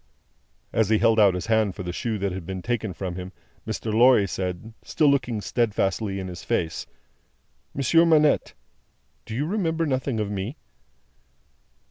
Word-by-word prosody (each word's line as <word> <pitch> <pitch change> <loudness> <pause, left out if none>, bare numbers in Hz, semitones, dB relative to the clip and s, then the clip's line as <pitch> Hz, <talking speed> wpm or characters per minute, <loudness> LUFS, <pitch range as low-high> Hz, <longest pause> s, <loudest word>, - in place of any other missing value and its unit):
As 110 -3 +2
he 110 - +4
held 115 0 +3
out 100 -3 +5
his 90 -1 -4
hand 110 -4 +1
for 95 - -6
the 90 -1 -4
shoe 110 +3 -2
that 100 -1 -2
had 95 0 -5
been 95 +1 -6
taken 115 -4 -2
from 90 0 -5
him, 90 0 -6 0.4
Mr. 110 0 -3
Lorry 120 -3 +5
said, 90 +4 -4
still 155 - 0
looking 125 -6 +1
steadfastly 100 -3 -1
in 95 - -5
his 90 -1 -8
face: 80 -2 -2 0.9
"Monsieur 140 +5 +4
Manette, 155 -3 +3 0.7
do 110 - -5
you 140 +5 -1
remember 165 -3 0
nothing 130 -4 -1
of 105 -1 -2
me?" 105 +8 -4
110 Hz, 160 wpm, -25 LUFS, 95-130 Hz, 0.9 s, out